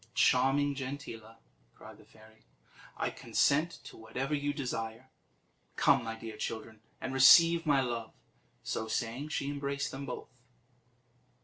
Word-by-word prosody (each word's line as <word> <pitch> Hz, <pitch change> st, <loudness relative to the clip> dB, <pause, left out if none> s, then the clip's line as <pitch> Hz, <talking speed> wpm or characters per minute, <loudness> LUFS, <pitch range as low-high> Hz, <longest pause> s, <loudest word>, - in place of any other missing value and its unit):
"Charming 135 Hz, +3 st, +3 dB
Gentilla," 130 Hz, -5 st, -7 dB, 0.4 s
cried -, -, -13 dB
the -, -, -17 dB
fairy, 110 Hz, 0 st, -20 dB, 0.5 s
"I -, -, -1 dB
consent 155 Hz, +4 st, +1 dB
to -, -, -11 dB
whatever 130 Hz, +6 st, -4 dB
you 145 Hz, 0 st, 0 dB
desire. 125 Hz, -3 st, -5 dB, 0.6 s
Come, 135 Hz, -3 st, +4 dB
my 115 Hz, 0 st, -4 dB
dear 110 Hz, -1 st, -8 dB
children, 110 Hz, 0 st, -6 dB, 0.2 s
and 130 Hz, 0 st, -4 dB
receive 165 Hz, +5 st, +7 dB
my 140 Hz, -2 st, +4 dB
love." 120 Hz, -3 st, -4 dB, 0.5 s
So 110 Hz, -, -3 dB
saying, 120 Hz, +5 st, -3 dB
she 140 Hz, -2 st, -2 dB
embraced 140 Hz, 0 st, -3 dB
them 140 Hz, +1 st, -7 dB
both. 125 Hz, 0 st, -8 dB
130 Hz, 130 wpm, -31 LUFS, 115-140 Hz, 0.6 s, receive